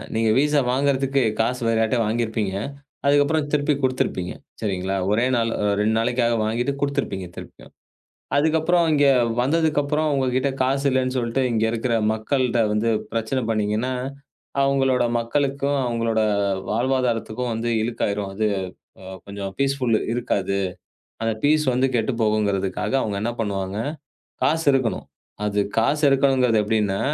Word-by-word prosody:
நீங்க 110 0 +2
விசா 150 +1 +3
வாங்குறதுக்கு 135 0 +1 0.2
காசு 125 +3 -1
வேற 115 0 +2
யார்ட்டியா 115 +2 +1
வாங்கியிருப்பீங்க. 110 -3 -1 0.5
அதுக்கப்புறம் 145 +2 +3
திருப்பிக் 145 -1 +1
குடுத்திருப்பீங்க. 125 -8 -1 0.3
சரிங்களா. 95 -2 -2 0.2
ஒரே 115 +4 +2
நாள் 115 -1 +1
அ - - 0
2 110 +1 +2
நாளைக்காக 120 0 +1
வாங்கிட்டு 120 +5 -1
குடுத்திருப்பீங்க 140 -10 -2
திருப்பியும். - - -12 0.7
அதுக்கப்புறம் 160 +3 +3
இங்க 145 -1 +4 0.3
வந்ததுக்கப்புறம் 150 +1 +1
உங்ககிட்ட 130 0 +1
காசு 135 +2 +1
இல்லைன்னு 130 0 0
சொல்ட்டு 120 +2 0
இங்க 110 -1 +1
இருக்கிற 115 +1 -1 0.2
மக்கள்கிட்ட 120 +2 0
வந்து 110 +2 +1 0.2
பிரச்சனை 115 +4 -1
பண்ணீங்கன்னா, 110 +3 0 0.7
அவங்களோட 135 -2 +2 0.2
மக்களுக்கும், 140 +3 0
அவங்களோட 115 -2 0 0.5
வாழ்வாதாரத்துக்கும் 125 0 0
வந்து 115 +1 -2
இழுக்காயிரும் 105 -4 -2
அது 110 +2 0 0.8
கொஞ்சம் 100 -1 -6
பீஸ்ஃபுல் 135 -4 +1 0.2
இருக்காது. 100 -5 -1 0.6
அந்த 115 0 0
பீஸ் 150 +1 +3
வந்து 130 +2 +2
கெட்டுப் 115 +1 0
போகும்ங்கறதுக்காக 100 -3 0
அவங்க 105 -2 -2
என்ன 115 +2 -1
பண்ணுவாங்க, 100 -2 -2 0.7
காசு 160 +1 +1
இருக்கணும். 130 -4 0 0.4
அது 105 0 0 0.2
காசு 145 +7 +1
இருக்கணும்கிறது 135 -4 +3
எப்படின்னா, 105 -2 0
120 Hz, 125 wpm, -23 LUFS, 110-140 Hz, 0.8 s, இங்க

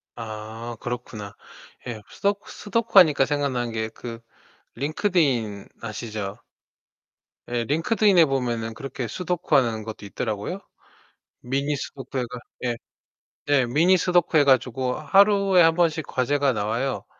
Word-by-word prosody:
아. 110 +1 -7
그렇구나. 120 -4 -6 0.5
예. 110 -3 -5
스도쿠 200 0 -2
스도쿠 215 0 +3
하니까 150 -6 +5
생각나는 135 -5 -1
게 110 0 -2
그 115 0 -8 0.6
링크드인 140 - 0
아시죠? 105 -2 -5 1.1
에. 120 -1 -1
링크드인에 175 +4 +4
보면은 120 -5 -2
그렇게 130 -1 -5
스도쿠하는 135 - 0
것도 110 -1 -8
있더라고요. 110 - -4 0.8
미니 140 +4 -1
스도쿠 135 -1 -6
해 125 - 0
가 125 +1 -7 0.2
예. 120 -1 0 0.7
네. 140 -3 +3
미니 165 +10 +4
스도쿠 175 -2 +2
해 145 - +6
가지고 130 -1 +2
하루에 195 +3 +4
1 165 -1 +5
번씩 165 -3 +1
과제가 140 +1 +1
나와요. 110 +5 -2
130 Hz, 285 characters per minute, -24 LUFS, 115-165 Hz, 1.1 s, 해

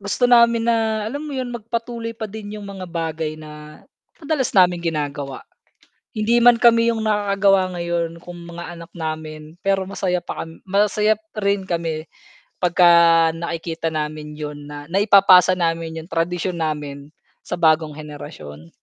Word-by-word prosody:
gusto 200 +5 -1
namin 235 -1 +5
na, 220 -2 0
alam 285 +5 -5
mo 290 - -6
yun? 250 -2 -3
Magpatuloy 230 0 -5
pa 220 - -5
din 215 0 -7
yung 205 - -8
mga 195 -2 -7
bagay 160 -2 -3
na, 150 0 -12 0.4
madalas 290 -4 -1
naming 180 -2 +5
ginagawa. 145 -4 -3 0.7
Hindi 230 +3 +2
man 240 0 +7
kami 230 -1 +5
yung 225 -1 -2
nakakagawa 200 -3 +2
ngayon, 170 -1 -2
kung 175 -1 -9
mga 170 0 -8
anak 170 0 -11
namin, 155 -1 -6
pero 195 -1 +1
masaya 185 -1 -1
pa - - -5
kam 165 0 -10
masaya 210 +2 +2
pa 215 -1 -9
rin 200 -1 +1
kami 165 -2 -3 0.5
pagka 180 0 +4 0.5
nakikita 165 0 -4
namin 150 -1 -5
yun 145 -1 -7
na, 145 0 -8
naipapasa 190 -2 +6
namin 165 -1 -1
yung 165 - -17
tradisyon 170 +1 -1
namin 145 -2 -4 0.3
sa - - -5
bagong 155 -2 +2
henerasyon. 85 - -10
175 Hz, 150 wpm, -21 LUFS, 155-210 Hz, 0.7 s, man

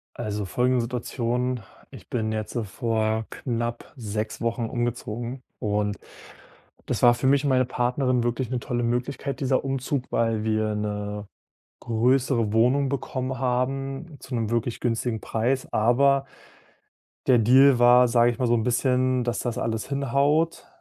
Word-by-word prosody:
Also, 105 -3 -3
folgende 125 +6 +1
Situation: 125 +1 -2 0.3
Ich - - -13
bin 110 -2 -1
jetzt, 110 +1 -4
äh, 120 - 0
vor 110 +1 -1
knapp 120 -2 -4
6 110 -3 -4
Wochen 115 0 -1
umgezogen 120 +1 -4 0.2
und 105 -1 -1 0.9
das - - -2
war 120 -1 +8
für 120 +2 -1
mich 140 +1 +4
und - - +2
meine 130 -1 +3
Partnerin 125 0 0
wirklich 120 +1 -1
'ne 125 -1 -1
tolle 120 +1 -2
Möglichkeit, 125 +4 -2
dieser 130 -1 +1
Umzug, 135 -1 -2
weil 115 -2 +1
wir 110 -1 0
'ne 105 0 -4 0.5
größere 120 -1 +1
Wohnung 130 +5 +3
bekommen 130 -1 -3
haben, 135 +4 -2
zu - - -10
'nem 115 -2 -1
wirklich 120 0 -1
günstigen 115 -1 -1
Preis. 125 +4 -1
Aber 135 +5 +3 1.0
der 125 -2 +6
Deal 130 +3 +6
war, 120 +1 +6
sage 120 0 +4
ich 115 - -10
mal, 125 - +1
so 120 - +3
'n 110 - +1
bisschen, 125 0 +1
dass 120 -1 -1
das 120 -2 -3
alles 115 +1 -2
hinhaut, 140 +3 +1
120 Hz, 150 wpm, -25 LUFS, 115-130 Hz, 1.0 s, war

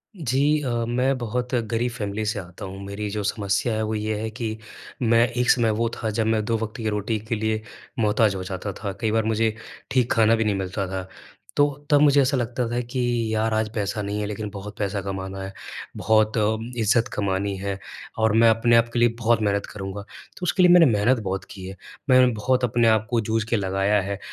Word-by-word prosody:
जी 150 - +1
अ, 135 - -2 0.2
मैं 125 +3 +1
बहुत 125 +2 -3 0.2
गरीब 120 +1 0
फैमिली 110 -1 -3
से 105 0 -1
आता 90 +2 -9
हूँ। 95 +1 -8
मेरी 105 +1 -4
जो 105 0 -3
समस्या 100 +2 0
है 110 - -1
वो 110 0 -2
ये 110 0 -2
है 110 +1 -3
कि 110 -2 -4 0.4
मैं 115 0 +4
एक 125 0 -1
समय 120 -3 +4
वो 115 - +1
था 110 - -1
जब 110 +1 0
मैं 110 -1 +1
दो 115 0 +1
वक़्त 110 -1 -5
की 110 -2 -2
रोटी 105 +1 -1
के 115 - +1
लिए 110 0 -1 0.4
मोहताज 105 -2 +3
हो 95 - -4
जाता 95 +1 -5
था। 100 -2 -2
कई 110 -1 +1
बार 110 0 +2
मुझे 110 0 +1 0.4
ठीक 125 -3 +2
खाना 115 0 +4
भी 110 - 0
नहीं 105 -2 +1
मिलता 95 0 -3
था। 95 0 -5 0.5
तो 145 - +6 0.2
तब 145 -2 +5
मुझे 145 -1 +6
ऐसा 135 0 +2
लगता 120 0 -1
था 120 - 0
कि 130 +1 -3 0.3
यार 110 0 +1
आज 110 0 0
पैसा 105 0 -2
नहीं 100 +1 -3
है - - -1
लेकिन 105 0 -4
बहुत 105 +1 -8
पैसा 100 0 -1
कमाना 95 0 -5
है, 95 0 -7 0.4
बहुत 110 0 +3 0.4
इज़्ज़त 115 +1 +2
कमानी 100 0 -1
है 100 0 -3 0.4
और 110 -1 +3
मैं 115 +1 +6
अपने 115 +1 +3
आप 115 0 +4
के 120 - 0
लिए 120 - +5
बहुत 115 -1 +2
मेहनत 100 -1 0
करूँगा, 95 0 -5
तो 110 - -14
उसके 185 +2 +2
लिए 180 - +7
मैंने 175 -2 +8
मेहनत 115 +1 +3
बहुत 95 0 -3
की 95 -2 -9
है। 95 - -7 0.3
मैं 130 -1 +6
बहुत 125 +4 0
अपने 120 -1 +2
आप 110 0 +3
को 120 -2 +1
जूझ 110 +1 0
के 115 - +2
लगाया 95 +1 +1
है 100 +1 -4
110 Hz, 220 wpm, -24 LUFS, 100-120 Hz, 0.5 s, मैंने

